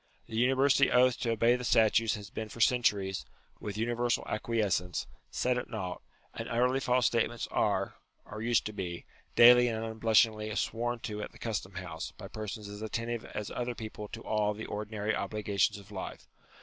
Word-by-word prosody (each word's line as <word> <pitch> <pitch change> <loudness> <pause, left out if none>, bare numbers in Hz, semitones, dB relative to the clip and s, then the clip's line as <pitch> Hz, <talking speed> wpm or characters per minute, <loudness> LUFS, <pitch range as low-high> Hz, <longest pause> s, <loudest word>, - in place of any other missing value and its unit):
The 110 - -8
university 135 +3 +4
oath 125 0 +4
to 120 - -1
obey 115 +2 +4
the 125 - -4
statutes 115 -1 +4
has 105 +1 -9
been 110 -2 -5
for 115 - -10
centuries, 105 -6 +2 0.4
with 105 0 -5
universal 120 +1 0
acquiescence, 105 -5 0 0.2
set 125 0 0
at 125 - -7
nought: 95 -6 -4 0.3
and - - -6
utterly 125 +3 +2
false 125 -2 +2
state 115 0 +2
ments 120 -1 -5
are - - +1 0.3
(or 105 +1 -7
used 115 0 +2
to 110 - -4
be) 90 -4 -5 0.3
daily 125 +1 +8
and 110 -1 -2
unblushingly 110 -1 +2
sworn 120 +2 -1
to 105 -1 -4
at - - -6
the - - -14
Custom 100 -5 -4
house, 90 -3 -6
by - - -8
persons 105 -1 -6
as 105 +1 -8
attentive 115 +1 -3
as 105 - -5
other 125 0 -3
people 110 -2 -7
to 115 - -8
all 105 -1 0
the 110 - -6
ordinary 105 0 -2
obligations 105 -1 0
of 100 +1 -14
life. 95 -2 -7
110 Hz, 180 wpm, -31 LUFS, 105-120 Hz, 0.4 s, daily